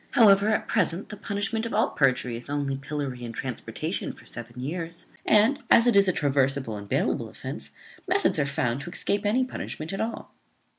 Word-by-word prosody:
However, 205 -3 +6
at 220 - +1
present, 185 -3 +1
the 210 - -6
punishment 205 +2 -2
of 225 - -4
all 220 - +2
perjury 125 -3 +1
is 120 +4 -8
only 145 -1 -1
pillory 135 -2 -4
and 115 -1 -6
transportation 125 -1 -4
for - - -17
seven 120 +1 -9
years; 165 +5 -4 0.2
and, 220 +7 +5
as 230 - +7
it 240 - +4
is 200 -1 +6
a - - +5
traversable 135 -6 +1
and 100 -1 -8
bailable - - 0
offence, - - -6 0.4
methods - - +2
are 140 - +2
found 125 -1 -1
to 175 - -7
escape 200 +3 0
any 245 +5 +3
punishment 165 -9 -5
at 195 - -2
all." 225 +1 -4
155 Hz, 190 wpm, -26 LUFS, 130-205 Hz, 0.4 s, as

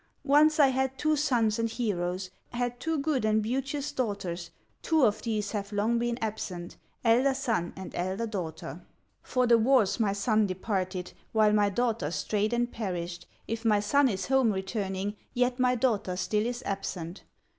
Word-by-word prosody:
Once 305 +2 +5
I 280 -2 +7
had 265 0 -1
two 310 +2 +2
sons 235 -7 +1
and 230 0 +1
heroes, 185 -5 -2 0.2
Had 245 0 -2
two 320 +3 -1
good 280 -4 0
and 215 0 +3
beauteous 270 +6 -2
daughters, 195 -8 -3 0.3
Two 315 -5 +3
of 215 -1 +1
these 215 -3 -2
have 205 -1 -4
long 215 +3 +1
been 240 0 -1
absent, 185 -5 -4 0.3
Elder 255 +4 +4
son 230 -10 -1
and 190 -1 -8
elder 190 +6 -2
daughter; 185 -8 -5 0.4
For 255 -1 +1
the 235 -1 +5
wars 240 -2 +3
my 205 -3 +2
son 215 +1 +2
departed, 185 -1 -3 0.2
While 215 -1 +4
my 205 -1 +4
daughter 225 -6 0
strayed 210 +5 -1
and 240 0 0
perished; 175 -5 -4 0.2
If 225 +1 -3
my 215 -3 +4
son 270 +7 +3
is 190 -4 -2
home 265 -3 +3
returning, 195 0 -3 0.2
Yet 250 +1 +1
my 250 0 +3
daughter 220 -7 0
still 210 +4 0
is 240 0 -4
absent." 190 -3 -4
220 Hz, 165 wpm, -29 LUFS, 195-250 Hz, 0.4 s, I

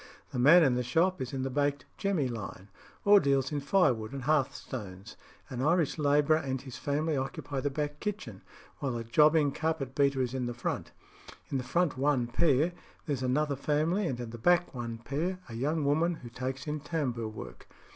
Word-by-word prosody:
The 125 - -3
man 160 +7 +7
in 135 -4 +4
the 125 - 0
shop 165 +9 +1
is 130 - -3
in 135 -2 -3
the 135 - -2
"baked 145 0 0
jemmy" 190 -9 0
line, 105 -4 -7 0.4
or 205 0 +8
deals 135 -3 +1
in 145 - -1
firewood 135 - +2
and 135 -2 -5
hearthstones. 120 -8 -2 0.3
An 125 -1 -5
Irish 160 +1 +2
labourer 150 +1 +4
and 135 -4 -2
his 130 -1 -9
family 150 +2 -1
occupy 135 +1 -3
the 145 - 0
back 145 +1 -3
kitchen, 195 - -5 0.4
while 130 -4 -2
a 115 - -4
jobbing 150 +5 +4
carpet 155 -4 -2
beater 140 -1 +2
is 125 0 -3
in 130 -2 -2
the 120 - -4
front. 125 - -3 0.6
In 135 - 0
the - - -4
front 165 +1 0
one 135 -3 +2
pair 145 +6 +2 0.3
there's 145 -5 -2
another 140 +3 +1
family, 155 +8 0
and 125 -5 -3
in 120 -2 -5
the 115 - -8
back 175 +7 +3
one 115 -2 -5
pair 150 +10 -2
a 120 - -9
young 145 +6 -1
woman 160 +5 +2
who 120 - -10
takes 130 +2 -5
in 150 0 -3
tambour 140 -7 -2
work. 110 - -9
140 Hz, 195 wpm, -30 LUFS, 125-155 Hz, 0.6 s, or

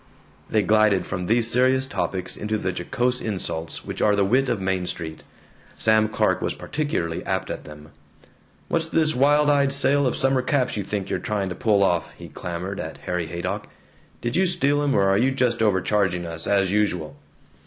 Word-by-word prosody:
They 110 -2 +2
glided 105 -3 +3
from 90 -1 -4
these 115 +3 +2
serious 130 +2 +3
topics 95 -8 -3
into 110 +1 -2
the 95 -3 -2
jocose 125 +8 -1
insults 90 -6 -4
which - - -5
are 105 -1 +4
the 100 -1 +2
wit 130 +6 +2
of 115 -4 0
Main 95 -1 -1
Street. 80 -3 -6 0.5
Sam 110 0 +3
Clark - - +1
was - - -2
particularly 115 - -3
apt - - -2
at - - -6
them. 75 0 -12 0.8
"What's 165 -1 0
this 160 -1 +2
wild 145 +3 +4
eyed 140 -1 +3
sale 140 0 +4
of 125 - -1
summer 135 -1 +2
caps 130 0 0
you 105 - -2
think 100 0 -4
you're - - 0
trying 100 -3 -2
to 90 - -5
pull 105 -3 +2
off?" 85 -3 0
he - - -10
clamored 90 +3 -5
at 80 -2 -6
Harry 90 -2 -2
Haydock. 85 +2 -4 0.5
"Did 120 0 -2
you 190 +1 +3
steal 145 -5 +1
'em, 145 -2 +1
or 100 - +4
are 95 +1 +3
you 130 - +3
just 125 -4 0
overcharging 95 -3 +1
us, 85 -1 -5
as 100 -2 +2
usual? 95 -7 0
105 Hz, 190 wpm, -23 LUFS, 90-130 Hz, 0.8 s, are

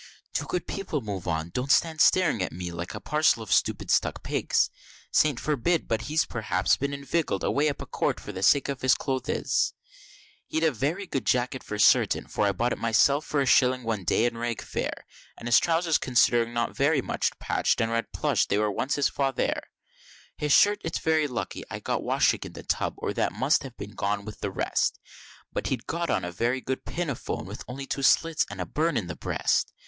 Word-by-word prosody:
Do, - - -1
good 180 - -3
people, 190 -6 -3
move 100 -5 -5
on! 80 -1 -1
don't 130 +6 -1
stand 160 0 +3
staring 170 - +4
at 90 - -2
me 90 0 -5
like 85 +1 -6
a - - -5
parcel 150 -6 +2
of 110 - -1
stupid - - +1
stuck - - +1
pigs; - - +1 0.4
Saints 150 -6 +2
forbid! 155 +3 0
but 115 0 0
he's 155 +2 +2
p'r'aps 105 -6 +1
been 140 +1 -1
inviggled 140 +3 -2
away 150 +2 +2
up 145 - -5
a - - -8
court - - -1
for - - -8
the 95 -2 -6
sake 140 +8 +4
of 140 -2 -4
his 130 -2 +4
clothes 130 -2 -1 0.7
He'd 160 - -1
a 160 - +4
very 150 - -2
good 135 -7 -3
jacket, 125 +1 +1
for 105 - -5
certain, 105 - +4
for 105 - 0
I - - +3
bought 120 +6 -1
it - - -3
myself 125 +6 +3
for 145 - +1
a - - +1
shilling 130 -1 +4
one 110 -4 -2
day 110 +5 +2
in 120 -1 -1
Rag 120 -1 -3
Fair; - - -4 0.3
And 115 - -7
his 120 - +6
trowsers 165 -1 +1
considering 120 -2 +3
not 120 0 -2
very 145 +2 +2
much - - -1
patch'd, - - 0
and 115 0 0
red 115 0 -1
plush, - - +1
they 100 - +1
was 105 0 +1
once 135 - 0
his 145 - +2
Father' 135 -2 -1 0.7
His 150 -1 -2
shirt, 205 +7 +5
it's 165 - -2
very 160 -2 +1
lucky 125 -4 -5
I'd - - -7
got - - -1
washing - - +2
in - - -7
the - - -9
tub, - - -1
or - - -3
that - - 0
might 130 +9 +2
have 130 -3 -9 0.2
gone 100 0 -1
with 110 - -8
the 100 - -2
rest 95 - 0 0.6
But - - -2
he'd 125 -4 -2
got 170 +1 -2
on 95 - 0
a 90 - -4
very 120 +8 0
good 130 +1 -4
pinafore 165 -7 -3
with - - -8
only 135 +2 -6
two 140 - -3
slits 165 +4 +3
and 100 -1 -8
a 90 - -2
burn 155 - 0
on 100 - -1
the 85 - -6
breast. - - 0
130 Hz, 215 wpm, -27 LUFS, 110-150 Hz, 0.7 s, his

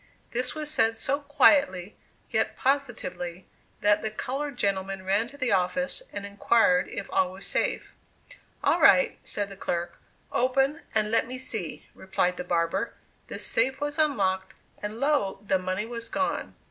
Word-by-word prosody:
This 250 +2 -1
was 305 -1 -3
said 225 -5 +2
so 280 +5 0
quietly, 280 -9 +3 0.4
yet - - 0
positively, 190 -10 -1 0.4
that 205 0 +4
the 220 - -1
colored 270 +5 -4
gentleman 195 -2 -1
ran 200 +4 +2
to 285 +3 -13
the 255 -4 0
office, 230 - +1
and 200 - -5
inquired 200 -2 +3
if 200 - -5
all 185 -1 +2
was 190 +1 -7
safe. - - -1 0.7
"All - - +3
right," - - +6
said 205 -1 -2
the 195 - -9
clerk. 175 -2 -3 0.3
"Open, 270 +5 +2
and 215 -1 +2
let 230 0 +2
me 255 +1 -5
see," 220 -10 -3
replied 180 -1 -1
the - - -3
barber. 170 -1 0 0.3
The - - -5
safe 265 +1 +1
was 290 +2 -2
unlocked 195 -11 +1 0.3
and 210 +2 -5
lo! 280 -8 +1
the 190 -2 +2
money 185 +3 -2
was 230 0 -6
gone! 280 - -2
220 Hz, 160 wpm, -27 LUFS, 190-270 Hz, 0.7 s, right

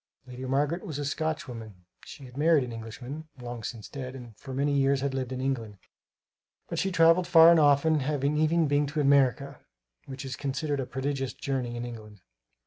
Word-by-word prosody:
Lady 125 0 -9
Margaret 145 +6 0
was 160 -9 -5
a 145 - -3
Scotchwoman. 125 - -4 0.2
She 140 - -11
had 125 -1 -13
married 155 0 +4
an 125 - -6
Englishman 120 +7 -8
(long 120 -1 -6
since 110 0 -6
dead), 130 -2 -7
and 120 -4 -10
for 135 - -10
many 140 +2 0
years 135 0 +2
had 140 -1 -1
lived 130 -1 -3
in 130 - -4
England, 120 -6 -3 0.9
but - - -2
she 195 - 0
travelled 165 +1 +4
far 165 0 +8
and 170 - +5
often, 150 +1 +4
having 145 +1 0
even 155 +1 +2
been 145 0 +2
to 150 +2 -3
America, 140 -4 +2 0.5
which 135 0 -7
is 135 -1 -4
considered 140 +1 -2
a 130 - -3
prodigious 135 0 -3
journey 130 -3 -3
in 120 0 -4
England. 105 -4 -10
135 Hz, 190 wpm, -28 LUFS, 125-150 Hz, 0.9 s, far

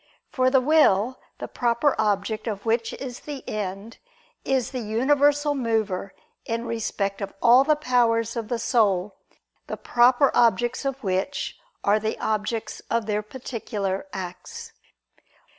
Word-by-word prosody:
For 255 -1 +2
the 265 0 +4
will, 255 -5 +3 0.2
the - - -6
proper 245 +4 +1
object 215 +1 0
of 205 -3 -4
which 230 0 +1
is 250 -3 -7
the 290 -3 -8
end, 205 +2 -5 0.4
is 265 -2 0
the 255 - -3
universal 285 +6 +2
mover 220 -7 -1 0.3
in 230 +1 -3
respect 210 -4 -2
of 195 0 -5
all 245 +4 +6
the 305 +2 +3
powers 235 -5 +1
of 230 -2 -3
the 240 0 -1
soul, 210 -5 +1 0.5
the - - -5
proper 245 +3 +4
objects 240 +3 +2
of 270 -1 -3
which 190 +8 -2 0.2
are 205 +2 +3
the 220 +1 -2
objects 215 +1 -2
of 230 -1 0
their 210 0 -1
particular 210 -2 -4
acts. 355 - -7
230 Hz, 140 wpm, -24 LUFS, 210-260 Hz, 0.5 s, all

